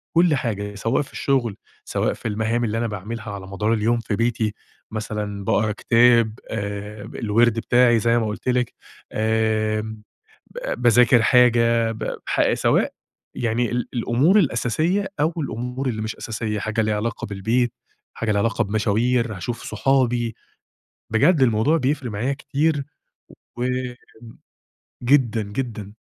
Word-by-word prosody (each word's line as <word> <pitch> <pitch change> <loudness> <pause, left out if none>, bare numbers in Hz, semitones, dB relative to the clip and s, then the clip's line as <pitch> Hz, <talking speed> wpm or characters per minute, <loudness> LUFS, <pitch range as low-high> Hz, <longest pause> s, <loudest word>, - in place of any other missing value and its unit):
وكل 170 -2 +5
حاجة، 105 -5 -3
سواء 115 +7 0
في 140 - -9
الشغل، 125 -7 0 0.3
سواء - - 0
في - - -6
المهام 110 +3 0
اللي 110 -1 -1
أنا 115 0 0
باعملها 110 +2 -6
على 100 -2 -7
مدار 105 +3 0
اليوم 115 +2 +1
في 110 -2 -2
بيتي، 115 -1 0 0.4
مثلًا 105 -2 -4
باقرا 110 +2 +2
كتاب، 115 +1 +3
آآ 105 0 -5
الوِرد 115 +1 +1
بتاعي 120 0 +4
زي 115 +2 +2
ما 115 - +1
قُلت 105 +4 -4
لِك، 125 -1 0 0.4
آمم، 110 0 0 0.5
ب 120 - -4
باذاكر 120 0 +5
حاجة، 115 -2 +4
ب 110 - -4
ح - - +2
سواء - - +2 0.4
يعني 120 0 0
ال 120 -1 -2
الأمور 130 - +3
الأساسية 165 - +1
أو 155 +3 +2
الأمور 125 -1 -3
اللي 110 -3 -2
مش 110 0 -4
أساسية، 110 -2 -3
حاجة 110 +2 -1
ليها 110 -1 0
علاقة 110 +1 -3
بالبيت، 110 +5 0 0.4
حاجة 115 - -2
ليها 100 - +1
علاقة 115 +2 +1
بمشاوير، 110 +3 0
هاشوف 115 +7 -5
صحابي، 120 -1 +1 0.8
بجد 140 +8 +4
الموضوع 120 +6 +3
بيفرِق 135 -3 -1
معايا 110 +6 -1
كتير 145 +1 0 0.7
و 120 - -1 1.4
جدًا 120 -4 +3
جدًا. 105 -1 -5
115 Hz, 140 wpm, -22 LUFS, 110-125 Hz, 1.4 s, وكل